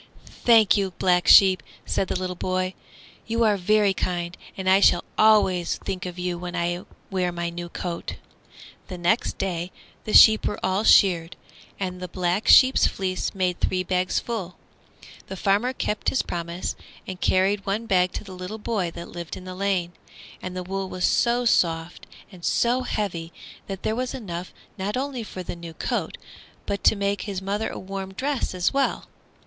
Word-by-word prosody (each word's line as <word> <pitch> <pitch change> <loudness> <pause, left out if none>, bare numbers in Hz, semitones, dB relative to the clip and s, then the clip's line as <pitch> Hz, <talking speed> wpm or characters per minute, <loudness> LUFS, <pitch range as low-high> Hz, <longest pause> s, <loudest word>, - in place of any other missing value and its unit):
"Thank 225 -4 +6
you, 195 -2 -1
Black 180 -1 +2
Sheep," 190 -2 +7 0.2
said 190 - -1
the - - -1
little 185 -1 -3
boy; 185 +1 -2 0.5
"you 230 +1 +1
are 215 -2 +4
very 200 +1 +2
kind, 175 -1 -3 0.2
and 190 -1 -4
I 190 +1 +6
shall 175 -3 +4
always 195 -5 +3
think 185 -1 -5
of 180 0 -8
you 180 -1 -3
when 180 0 -6
I 175 +1 -2 0.3
wear 180 -2 0
my 170 0 -3
new 175 0 -6
coat." 170 -1 -5 0.7
The 185 - -7
next 175 +7 0
day 180 -1 -3 0.3
the 215 - -4
sheep 220 -1 +8
were - - -3
all 190 +3 +1
sheared, 175 -4 +4 0.4
and 185 -2 -3
the 180 - -4
Black 180 +3 -1
Sheep's 260 0 +7
fleece 185 0 -3
made 180 -2 0
three 185 0 0
big 185 0 0
bagsful. 190 -7 -3 0.7
The 190 - -7
farmer 205 +7 +1
kept 215 -4 -1
his 260 - 0
promise 170 +1 -4 0.3
and 185 -1 -7
carried 195 +2 +2
one 210 +4 -1
bag 180 -4 +2
to - - -5
the 195 -2 -10
little 185 +4 -6
boy 210 -5 -2
that 170 - -7
lived 170 -2 -7
in 185 - -11
the 185 - -6
lane, 185 -2 -1 0.5
and 185 0 -6
the 180 - -3
wool 190 +1 -4
was 185 -1 -1
so 240 +1 +2
soft 165 -5 +1 0.2
and 180 -3 -14
so 240 +7 +2
heavy 175 -9 -3 0.4
that 195 -1 -6
there 220 - 0
was 255 +1 -3
enough 180 -7 -6 0.3
not 205 +5 -2
only 265 -2 -3
for 190 -4 -7
the 175 - -6
new 170 -1 -10
coat, - - -3 0.5
but 200 -1 -3
to - - +6
make 200 0 -1
his 200 -3 -4
mother 200 +3 -2
a - - -7
warm 190 0 -6
dress 270 -4 -2
as 180 -1 +1
well. 275 0 0
185 Hz, 180 wpm, -24 LUFS, 180-205 Hz, 0.7 s, sheep